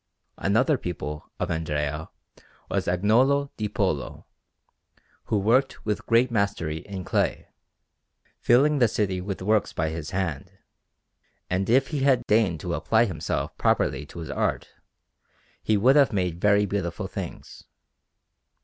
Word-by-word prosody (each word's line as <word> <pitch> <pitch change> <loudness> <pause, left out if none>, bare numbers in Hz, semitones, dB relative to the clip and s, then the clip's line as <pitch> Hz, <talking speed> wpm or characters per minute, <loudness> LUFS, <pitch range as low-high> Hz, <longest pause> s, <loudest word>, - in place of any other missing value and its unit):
Another 130 +8 +2
pupil 75 -4 -6
of - - -2
Andrea 75 -1 -2 0.6
was - - -1
Agnolo 125 +10 +2
di 105 -1 -3
Polo, 95 -9 -2 1.0
who 105 - 0
worked 120 +7 +1
with 105 -1 -2
great 120 +2 +3
mastery 100 -8 -1
in 95 +3 -7
clay, - - -1 0.9
filling 140 +5 +4
the 120 - +5
city 95 -4 -1
with 95 0 -5
works 105 +1 +1
by 80 -1 -1
his 80 -1 -5
hand; 85 -7 -3 1.0
and 95 +2 0
if 130 +3 +3
he 150 - -2
had 135 -3 +2
deigned 105 -7 +2
to 90 - -3
apply 115 +5 +2
himself 90 -8 -3
properly 70 +2 +1
to - - -13
his 80 -2 -6
art, - - -1 0.9
he 110 - +2
would 125 +7 +4
have 140 -2 +5
made 90 -4 -2
very 105 0 +4
beautiful 90 -4 -3
things. - - -8
100 Hz, 135 wpm, -25 LUFS, 85-115 Hz, 1.0 s, the